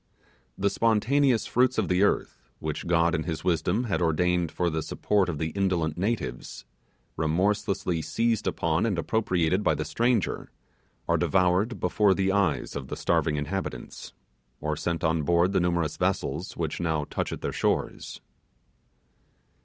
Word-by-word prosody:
The 100 0 +1
spontaneous 115 +4 +2
fruits 130 +1 +2
of 110 -4 +1
the 90 +1 +2
earth, 60 -11 0
which - - -4
God 85 0 +3
in 80 - 0
his 80 -3 -4
wisdom 90 +6 +1
had 105 -6 -1
ordained 85 +1 +1
for 90 - -1
the 80 0 -1
support 100 +3 0
of 80 - -3
the 80 +1 -2
indolent 90 -4 0
natives, 95 - -3 0.5
remorselessly 90 +1 0
seized 115 +6 0
upon 85 +6 0
and 100 -5 -1
appropriated 90 -2 +1
by - - +2
the 75 - -3
stranger, 115 +7 0 0.6
are 85 - +3
devoured 90 +6 +2
before 95 +2 +3
the 95 0 +1
eyes 95 -6 0
of 70 -2 -5
the - - -5
starving 75 - +1
inhabitants, 75 -3 -5 0.5
or 75 0 -2
sent 85 +2 -2
on 80 0 +2
board 85 +4 +2
the - - +3
numerous 85 -3 0
vessels 75 +7 -2
which 80 -3 -3
now 80 -3 0
touch - - -3
at - - -6
their - - -3
shores. - - -2
90 Hz, 155 wpm, -27 LUFS, 80-100 Hz, 0.6 s, God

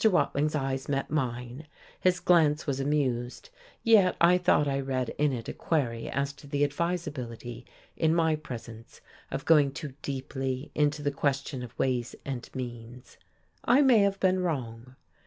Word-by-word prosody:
Watling's 155 -7 +2
eyes 135 -2 -2
met 135 -1 -1
mine; 125 0 -3 0.3
his 180 -1 +2
glance 160 -4 +3
was 140 -3 -1
amused, 135 - -1 0.3
yet 210 -5 +5
I 175 +1 +5
thought 150 -4 +3
I 135 0 0
read 130 -3 -2
in 150 -1 +3
it 120 -3 -5
a - - -4
query 120 -8 -1
as 140 +1 -1
to 145 - -13
the 145 0 0
advisability, 145 -7 -3 0.3
in 160 0 +2
my 160 -2 +3
presence, 115 -6 -9 0.3
of - - -4
going 150 -4 +5
too 145 -1 -7
deeply 135 0 -4
into 150 0 +1
the 145 - +1
question 140 -1 -1
of 125 -2 -9
ways 125 -2 -1
and 130 -3 -5
means. 120 -1 -8 0.5
I 260 +4 +5
may 255 -5 +6
have 200 -1 +2
been 185 0 +2
wrong. 125 -7 -4
140 Hz, 155 wpm, -28 LUFS, 125-160 Hz, 0.5 s, may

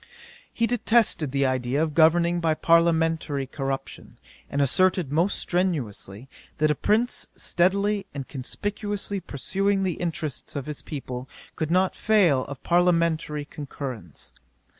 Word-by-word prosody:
'He 230 - +1
detested 225 - +2
the 140 0 +1
idea 130 +1 0
of 155 -2 -2
governing 170 +2 +4
by 160 -2 +1
parliamentary 165 -4 +2
corruption, 135 0 -5 0.3
and 140 - -2
asserted 175 +2 +2
most 170 +6 +2
strenuously, 135 - -2 0.3
that 155 0 +3
a - - +3
prince 220 - 0
steadily 200 +3 +1
and 135 -2 -6
conspicuously 205 - -4
pursuing 195 +6 -1
the 185 -2 0
interests 160 -6 -4
of 140 -2 -3
his 150 -1 -6
people, 130 -4 -6 0.3
could 155 -2 -2
not 185 +2 +2
fail 180 -12 +3
of 140 -1 -9
parliamentary 170 -4 +1
concurrence. 130 - -7
160 Hz, 125 wpm, -25 LUFS, 140-185 Hz, 0.3 s, governing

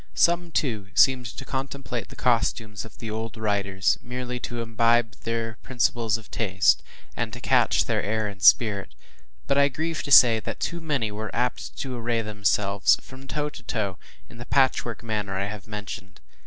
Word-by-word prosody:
Some, 170 0 +3
too, 115 -11 -1
seemed 130 -3 +4
to 135 - -8
contemplate 135 -4 -4
the - - -12
costumes 115 -4 0
of 110 - -13
the 115 -2 -6
old 110 +1 -5
writers, 100 -3 0
merely 125 0 -5
to 120 -1 -5
imbibe 115 0 +2
their 115 0 -3
principles 120 -3 0
of 110 -2 -15
taste, 95 -5 +3 0.3
and - - -2
to - - -6
catch - - +3
their - - 0
air 110 +1 -1
and 100 -1 -9
spirit; 100 +1 +4 0.5
but 140 - +2
I 140 - +6
grieve 160 +3 -3
to 145 - -6
say, 115 -4 +8
that - - -6
too 170 0 -3
many 140 -9 -1
were 110 +1 -5
apt 125 +1 -2
to 130 -2 -4
array 115 -1 -1
themselves, 105 -1 +2
from 135 +1 -13
top 150 +1 -2
to - - -10
toe, 100 -5 -3 0.3
in 115 - -14
the 120 - -8
patchwork 125 -4 +1
manner 105 -4 -3
I 100 - -1
have 100 -1 -7
mentioned. 105 -2 -7
115 Hz, 180 wpm, -25 LUFS, 105-125 Hz, 0.5 s, say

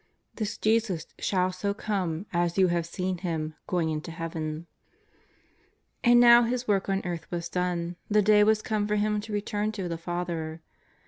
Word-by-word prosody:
''this 215 -1 -3
JESUS 215 -7 +1
SHALL 185 -1 +1
SO 200 +2 -2
COME 190 -5 -2
AS 175 0 0
YOU 190 -2 +5
HAVE 170 -1 0
SEEN 180 +1 -3
HIM 160 -3 -3
GOING 170 -3 0
INTO 155 +1 -4
heaven/'' 165 -1 -5 1.4
And 240 0 +6
now 240 0 +8
His 245 +1 -1
work 200 -2 +1
on 195 0 0
earth 175 -2 -4
was 170 -1 -4
done; 175 -1 -2
the 210 0 +4
day 210 0 +6
was 215 0 +3
come 210 -2 -1
for 210 - 0
Him 210 0 +1
to 220 +1 -9
return 210 +1 -1
to 195 -4 -4
the 165 -1 -4
Father. 170 -2 -4
185 Hz, 175 wpm, -27 LUFS, 170-210 Hz, 1.4 s, now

